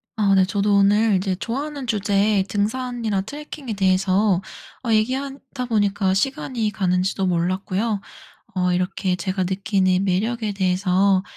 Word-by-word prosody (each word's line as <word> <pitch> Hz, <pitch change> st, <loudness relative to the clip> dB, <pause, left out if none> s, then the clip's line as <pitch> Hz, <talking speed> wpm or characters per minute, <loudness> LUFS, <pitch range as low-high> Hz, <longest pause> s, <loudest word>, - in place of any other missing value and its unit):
아 205 Hz, -3 st, +2 dB
네 190 Hz, -, +5 dB
저도 200 Hz, +2 st, +1 dB
오늘 205 Hz, +2 st, +4 dB
이제 190 Hz, 0 st, 0 dB
좋아하는 275 Hz, +6 st, -4 dB
주제의 205 Hz, -1 st, +2 dB
등산이랑 220 Hz, 0 st, -2 dB
트래킹에 290 Hz, -2 st, -7 dB
대해서 190 Hz, 0 st, +2 dB, 0.4 s
어 235 Hz, -, -1 dB
얘기하다 260 Hz, +3 st, -1 dB
보니까 205 Hz, -4 st, +1 dB
시간이 235 Hz, -1 st, -1 dB
가는지도 190 Hz, -1 st, 0 dB
몰랐고요. 185 Hz, +4 st, -1 dB, 0.5 s
어 180 Hz, -1 st, +1 dB
이렇게 180 Hz, +1 st, -1 dB
제가 185 Hz, +1 st, -2 dB
느끼는 190 Hz, 0 st, +1 dB
매력에 215 Hz, +4 st, 0 dB
대해서 190 Hz, 0 st, +2 dB
200 Hz, 315 characters per minute, -22 LUFS, 185-225 Hz, 0.5 s, 네